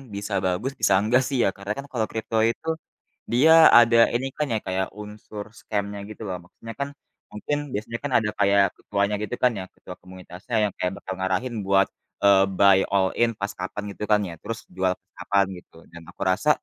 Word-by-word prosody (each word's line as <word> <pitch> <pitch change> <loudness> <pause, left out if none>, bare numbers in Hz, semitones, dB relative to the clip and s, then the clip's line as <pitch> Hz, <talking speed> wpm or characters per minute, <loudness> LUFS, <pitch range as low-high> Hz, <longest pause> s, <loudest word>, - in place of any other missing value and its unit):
bisa 100 +1 -5
bagus 95 +9 -1
bisa - - +3
enggak 120 +5 +2
sih 135 - -2
ya. - - +3
Karena 100 +1 -6
kan 140 - -6
kalau 115 -4 0
crypto 110 0 -3
itu 160 - -6 0.6
dia 135 +7 +5 0.2
ada 115 0 +7 0.2
ini 130 +3 0
kan 150 - 0
ya 110 - +1
kayak 95 0 -1
unsur 105 0 -8
scam-nya 100 -1 -3
gitu 110 - -11
loh. 90 -1 -3
Maksudnya 115 +5 -10
kan 140 0 -2 0.4
mungkin 145 +8 -2 0.2
biasanya 115 +3 -4
kan 145 - -3
ada 110 -2 0
kayak 100 0 +4
ketuanya 100 0 -1
gitu 115 - -3
kan 125 - +5
ya, - - -4
ketua 90 - -11
komunitasnya 90 +4 -8
yang 105 - 0
kayak 90 - -1
bakal 95 - -5
ngarahin 95 +6 -1
buat, 95 0 +3 0.3
eee, 100 -1 +6
buy 100 -1 +6
all 95 -1 +3
in 120 0 +2
pas 100 -1 -4
kapan 95 +3 -5
gitu 100 - -7
kan 105 - +5
ya 85 - -8
terus 115 - -4 0.2
jual 95 -1 +1 0.2
kapan 100 -1 +2
gitu. 90 - -17 0.2
Dan 85 -1 -12
aku - - -16
rasa 100 +11 +1
100 Hz, 200 wpm, -24 LUFS, 95-115 Hz, 0.6 s, ada